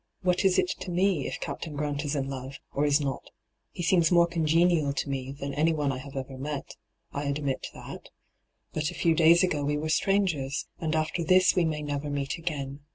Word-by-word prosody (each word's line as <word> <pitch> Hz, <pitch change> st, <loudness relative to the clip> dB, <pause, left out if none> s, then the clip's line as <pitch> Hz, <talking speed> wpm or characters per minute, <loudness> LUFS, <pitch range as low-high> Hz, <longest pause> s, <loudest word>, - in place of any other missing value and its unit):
' -, -, -50 dB
What 180 Hz, -1 st, +2 dB
is 190 Hz, -1 st, +4 dB
it -, -, +2 dB
to -, -, -6 dB
me 180 Hz, -4 st, +1 dB
if -, -, -5 dB
Captain 155 Hz, -3 st, -5 dB
Grant 145 Hz, 0 st, -2 dB
is 145 Hz, 0 st, -2 dB
in 135 Hz, -1 st, -1 dB
love, 135 Hz, 0 st, -6 dB
or 145 Hz, -, +1 dB
is 145 Hz, +1 st, +4 dB
not? 135 Hz, -3 st, -3 dB, 0.4 s
He 175 Hz, -, -6 dB
seems 170 Hz, -1 st, +3 dB
more 170 Hz, -1 st, +6 dB
congenial 165 Hz, -2 st, +2 dB
to 145 Hz, -, -2 dB
me 135 Hz, -1 st, -3 dB
than 140 Hz, 0 st, -5 dB
anyone 150 Hz, -1 st, +1 dB
I 130 Hz, -, -4 dB
have 140 Hz, +1 st, -10 dB
ever 130 Hz, 0 st, -5 dB
met 145 Hz, 0 st, -5 dB, 0.2 s
— -, -, -50 dB
I 145 Hz, +1 st, -3 dB
admit 140 Hz, -1 st, -2 dB
that. -, -, -9 dB, 0.6 s
But 150 Hz, 0 st, -1 dB
a -, -, -8 dB
few 165 Hz, -, +3 dB
days 170 Hz, +2 st, +6 dB
ago 155 Hz, -6 st, +1 dB
we 145 Hz, +1 st, 0 dB
were 155 Hz, +1 st, -3 dB
strangers, 165 Hz, -6 st, +1 dB
and 160 Hz, -1 st, -1 dB
after 160 Hz, +2 st, 0 dB
this 185 Hz, +2 st, +5 dB
we 180 Hz, -2 st, +3 dB
may 155 Hz, -2 st, -2 dB
never 145 Hz, 0 st, -3 dB
meet 140 Hz, +1 st, -2 dB
again. 140 Hz, -4 st, -4 dB
150 Hz, 220 wpm, -28 LUFS, 140-170 Hz, 0.6 s, more